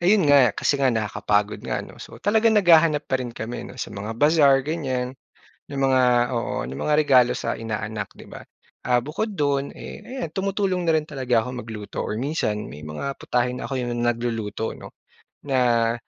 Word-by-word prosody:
Ayon 180 -4 +4
nga, 130 -6 +6
kasi 140 - +1
nga 135 - +3
nakakapagod 105 -2 0
nga, - - -2
'no? - - -13
So - - -10
talagang 220 +2 +3
naghahanap 165 -6 +5
pa 130 - +2
rin 120 -2 -5
kami, 115 +2 -5
'no, - - -11
sa - - -5
mga 105 +3 -5
bazaar, 140 0 +4
ganyan. 130 -4 -3 0.5
'Yong 140 -1 -4
mga 130 -1 +3 0.3
oo, 115 - -2
no'ng 65 - -6
mga 150 - +2
regalo 130 -5 +5
sa - - -3
inaanak, 110 -1 -4
'di - - -14
ba? - - -10 0.4
Ah, 125 0 +3
bukod 165 - -3
do'n, 140 -5 0
eh, - - -10
ayan, 255 -10 -5
tumutulong 190 0 -1
na 165 - +3
rin 155 0 0
talaga 130 -5 +1
ako 125 +1 -6
magluto 110 -2 -6
or 110 - -3
minsan 120 -7 -2
may 75 +1 -10
mga 105 - -5
putahe 125 0 -1
na - - -6
ako 135 -2 -2
'yong 120 -1 -3
nagluluto, 115 -2 -2
'no, - - -11 0.5
na, 120 -4 +2
130 Hz, 185 wpm, -23 LUFS, 115-150 Hz, 0.5 s, nga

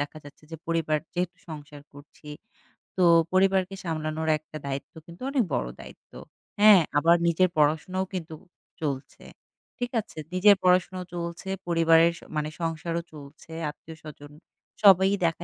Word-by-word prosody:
দেখা 145 +2 -5
যাচ্ছে 145 +1 -15
যে 165 - -6
পরিবার 160 -2 0 0.2
যেহেতু 180 0 -2
সংসার 145 -2 -10
করছি 145 +1 -16 0.7
তো 185 - +3 0.3
পরিবারকে 190 0 +2
সামলানোর 160 -1 -3
একটা 155 0 -11
দায়িত্ব 140 0 -5
কিন্তু 170 +6 -14
অনেক 270 -4 +1
বড় - - -1
দায়িত্ব। - - -14 0.5
হ্যাঁ, 210 -4 +8 0.2
আবার 165 +3 +5
নিজের 180 +2 +3
পড়াশোনাও 160 +5 +1
কিন্তু 165 -3 -5 0.5
চলছে। 140 -3 -5 0.6
ঠিক 245 0 -3
আছে? 160 - -19 0.2
নিজের 200 +3 +6
পড়াশোনাও 185 0 +2
চলছে, 170 +2 -5 0.2
পরিবারের 165 0 +4
স - - -24
মানে 150 0 -1
সংসারও 165 +1 -2
চলছে। 150 +2 -13 0.2
আত্মীয়স্বজন 150 -1 -12 0.5
সবাই 190 -1 +7 0.2
দেখা 165 +1 -1
165 Hz, 135 wpm, -26 LUFS, 155-185 Hz, 0.7 s, হ্যাঁ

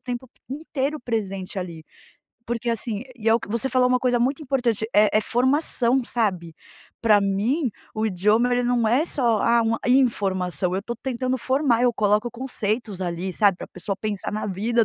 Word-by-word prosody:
tempo 250 +1 -5 0.2
inteiro 290 +1 -3
presente 195 -5 -3
ali, 170 -4 -6 0.6
porque 240 0 -3
assim 230 -2 -2
e 225 -2 -1
é - - +6
o 235 - +2
que - - -9
você 235 +4 -1
falou 255 -1 +3
uma 250 0 +3
coisa 245 -1 +2
muito 270 +5 0
importante, 245 -6 0
é 210 +1 +6
é 215 - +5
formação, 260 0 +1
sabe. 185 -9 -2 0.5
Pra 215 -3 +5
mim 215 +10 0 0.3
o 220 0 0
idioma, 215 +6 +2
ele 245 0 +2
não 240 -2 +1
é 250 +8 +3
só, 240 -9 +1
ah, 235 0 +4
uma 225 0 +1
informação, 190 - +1
eu 190 - 0
tô 235 +3 -4
tentando 255 +1 -2
formar, 260 -1 +1
eu 245 -1 +4
coloco 210 +2 +1
conceitos 225 -5 -3
ali, 175 +1 -3
sabe, 200 -2 +3
pra - - -7
a - - -15
pessoa 195 - -4
pensar 205 -2 -3
na 210 0 -3
vida 220 +4 +1
230 Hz, 185 wpm, -23 LUFS, 205-250 Hz, 0.6 s, é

